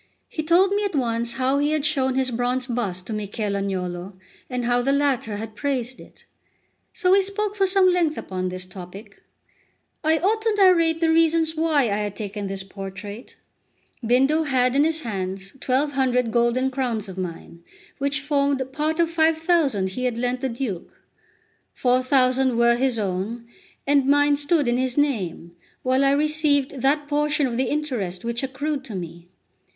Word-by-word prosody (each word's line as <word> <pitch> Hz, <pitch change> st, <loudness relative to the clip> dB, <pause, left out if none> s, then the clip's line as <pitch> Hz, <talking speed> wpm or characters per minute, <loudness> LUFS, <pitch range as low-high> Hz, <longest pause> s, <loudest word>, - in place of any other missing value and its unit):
He 315 Hz, -, -4 dB
told 345 Hz, +5 st, +4 dB
me 410 Hz, +1 st, +1 dB
at 400 Hz, -5 st, -2 dB
once 235 Hz, -2 st, 0 dB
how 260 Hz, +3 st, +1 dB
he 295 Hz, +1 st, +1 dB
had 305 Hz, -2 st, 0 dB
shown 265 Hz, -4 st, +1 dB
his 260 Hz, -1 st, +1 dB
bronze 245 Hz, +2 st, -1 dB
bust 205 Hz, -8 st, -3 dB
to 225 Hz, -, -5 dB
Michel 205 Hz, 0 st, -3 dB
Agnolo, 185 Hz, -1 st, -3 dB, 0.4 s
and 250 Hz, -2 st, -2 dB
how 245 Hz, 0 st, +2 dB
the 270 Hz, +3 st, +1 dB
latter 275 Hz, -7 st, 0 dB
had 220 Hz, +1 st, -6 dB
praised 260 Hz, 0 st, -3 dB
it. -, -, -16 dB, 0.7 s
So 365 Hz, -2 st, +1 dB
we 395 Hz, +1 st, +6 dB
spoke 400 Hz, +1 st, -3 dB
for 390 Hz, -2 st, +2 dB
some 380 Hz, 0 st, +4 dB
length 335 Hz, -4 st, +1 dB
upon 185 Hz, -1 st, -3 dB
this 185 Hz, 0 st, -6 dB
topic. 185 Hz, +3 st, -11 dB, 0.8 s
I 315 Hz, +1 st, +3 dB
ought 425 Hz, +6 st, +1 dB
to 440 Hz, -1 st, +1 dB
narrate 335 Hz, -4 st, +4 dB
the 325 Hz, -1 st, +3 dB
reasons 325 Hz, 0 st, +3 dB
why 315 Hz, -3 st, +2 dB
I 205 Hz, -4 st, 0 dB
had 205 Hz, -1 st, -3 dB
taken 205 Hz, -1 st, -5 dB
this 195 Hz, 0 st, -4 dB
portrait. 195 Hz, +3 st, -9 dB, 0.7 s
Bindo 270 Hz, +7 st, +3 dB
had 255 Hz, -1 st, +2 dB
in 285 Hz, +2 st, +4 dB
his 320 Hz, 0 st, 0 dB
hands 195 Hz, -4 st, -5 dB
1200 260 Hz, -3 st, +1 dB
golden 240 Hz, +3 st, +1 dB
crowns 245 Hz, -5 st, -2 dB
of 190 Hz, -, -8 dB
mine, 170 Hz, -2 st, -7 dB, 0.4 s
which 280 Hz, 0 st, 0 dB
formed 280 Hz, -1 st, +1 dB
part 310 Hz, +3 st, -1 dB
of 335 Hz, -, +4 dB
5000 320 Hz, -, +2 dB
he 255 Hz, +6 st, -3 dB
had 245 Hz, -2 st, -1 dB
lent 245 Hz, +1 st, -1 dB
the 265 Hz, -, -1 dB
Duke; 230 Hz, -7 st, -5 dB, 0.7 s
4000 255 Hz, 0 st, +2 dB
were 235 Hz, 0 st, +4 dB
his 255 Hz, -1 st, 0 dB
own, 205 Hz, +4 st, -3 dB, 0.4 s
and 280 Hz, -1 st, +3 dB
mine 290 Hz, +1 st, +4 dB
stood 290 Hz, 0 st, +1 dB
in 240 Hz, 0 st, +2 dB
his 255 Hz, 0 st, -1 dB
name, 205 Hz, -, -1 dB, 0.3 s
while 260 Hz, +1 st, +2 dB
I 275 Hz, -, +4 dB
received 290 Hz, -3 st, +1 dB
that 290 Hz, +2 st, +1 dB
portion 295 Hz, 0 st, +1 dB
of 245 Hz, -3 st, -2 dB
the 260 Hz, +2 st, +1 dB
interest 235 Hz, -12 st, -3 dB
which 235 Hz, 0 st, -1 dB
accrued 275 Hz, +2 st, -3 dB
to 225 Hz, -6 st, -7 dB
me. 170 Hz, -1 st, -8 dB
260 Hz, 170 wpm, -23 LUFS, 220-300 Hz, 0.8 s, we